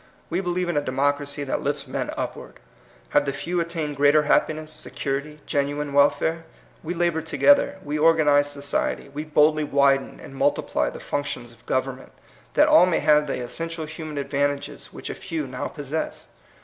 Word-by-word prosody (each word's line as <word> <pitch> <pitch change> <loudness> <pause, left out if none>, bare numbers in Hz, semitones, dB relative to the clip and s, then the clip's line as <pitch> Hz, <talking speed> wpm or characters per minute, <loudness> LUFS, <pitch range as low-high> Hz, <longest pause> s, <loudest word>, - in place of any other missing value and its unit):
We 175 +3 0
believe 180 -1 -1
in 175 -3 -1
a - - +3
democracy 145 +2 -1
that 135 - -2
lifts - - -2
men - - -3
upward. - - -5 0.5
Have 145 - +3
the 140 - 0
few 175 +5 -2
at 170 - -3
tained 155 -4 -3
greater 145 +2 +5
happiness, 155 +1 +1
security, 150 0 -4
genuine 145 0 -1
welfare? 160 +3 +3 0.4
We 170 +2 -4
labor 170 -1 +1
together, 190 - +3
we 150 +1 -2
organize 150 -3 +4
society, 140 0 -2
we 145 +2 -5
boldly 155 0 +3
widen 140 -1 +2
and - - -11
multiply 140 +1 0
the - - -9
functions 140 -4 -4
of 115 - -21
government, 130 0 -2 0.4
that 300 - +6
all 305 -12 +7
may 175 - +1
have 150 0 +4
the 125 - -3
essential 165 +5 -4
human 155 -1 -7
advantages 140 0 -2
which - - -7
a - - -4
few 160 -3 -4
now 130 -1 -4
possess. 150 +1 -5
150 Hz, 170 wpm, -24 LUFS, 140-160 Hz, 0.5 s, all